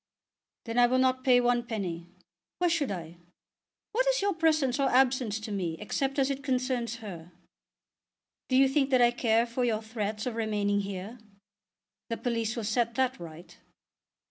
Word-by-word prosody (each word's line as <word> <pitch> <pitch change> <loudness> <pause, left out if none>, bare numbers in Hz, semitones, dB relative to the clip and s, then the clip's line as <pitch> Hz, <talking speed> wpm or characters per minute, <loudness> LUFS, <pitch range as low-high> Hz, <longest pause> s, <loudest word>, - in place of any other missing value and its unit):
"Then 230 +1 -1
I 240 - +6
will 255 +1 +1
not 255 0 +2
pay 250 -2 +5
one 245 0 +2
penny. 180 -7 -4 0.5
Why 355 -1 +2
should 325 -5 0
I? 170 -3 -6 0.7
What - - +1
is - - +3
your 400 0 +1
presence 310 -6 +1
or 275 - +2
absence 250 -4 +2
to 215 0 -6
me 175 -5 -2
except 270 +6 -2
as 275 0 +2
it 275 0 -4
concerns 255 -3 -1
her? 175 -3 -9 1.2
Do 260 - +2
you 270 +1 +6
think 270 0 +1
that 255 -2 +4
I 240 - +5
care 230 -1 +2
for 240 +1 -2
your 225 -2 0
threats 215 -1 -4
of 250 - -2
remaining 210 -2 0
here? 200 +4 -6 0.9
The 230 - -2
police 230 -2 -2
will 230 - -3
set 230 +2 0
that 260 -3 0
right." 170 0 -11
240 Hz, 170 wpm, -29 LUFS, 210-260 Hz, 1.2 s, I